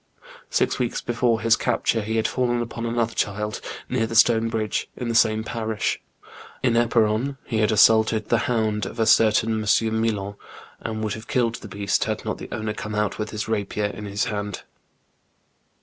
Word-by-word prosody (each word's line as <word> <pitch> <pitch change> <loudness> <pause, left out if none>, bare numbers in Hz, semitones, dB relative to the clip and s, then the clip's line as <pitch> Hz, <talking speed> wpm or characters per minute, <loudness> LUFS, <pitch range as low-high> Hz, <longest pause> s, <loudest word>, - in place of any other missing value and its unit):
Six - - +1
weeks 125 -2 -1
before 120 -1 0
his 115 0 +4
capture 115 -2 0
he 110 +2 -3
had 110 - +2
fallen 120 -1 0
upon 115 0 -4
another 115 0 0
child, 105 +1 -2 0.3
near 120 -3 0
the 115 - -5
stone 115 0 +5
bridge, 110 -2 -2
in 125 -2 -3
the - - 0
same 110 -1 +3
parish. 110 -1 -2 0.6
In 125 -3 +3
Eparon 115 +3 +2
he 115 -4 -1
had 110 +1 +3
assaulted 110 0 +4
the 120 - +3
hound 110 -4 0
of 115 - -9
a 110 - +3
certain 110 0 +4
M. 110 +1 +2
Millon, 100 -3 -2 0.4
and 110 -1 -4
would 105 -2 -1
have 110 +1 -8
killed 120 -3 +1
the - - -8
beast, 100 -1 0
had - - -3
not - - -3
the - - -8
owner 110 0 -3
come 110 0 -5
out 105 -1 -1
with 105 0 -2
his 105 -1 -4
rapier 105 -1 -1
in 105 - -7
his 100 +1 -1
hand. 105 -2 -4
110 Hz, 185 wpm, -24 LUFS, 105-115 Hz, 0.6 s, stone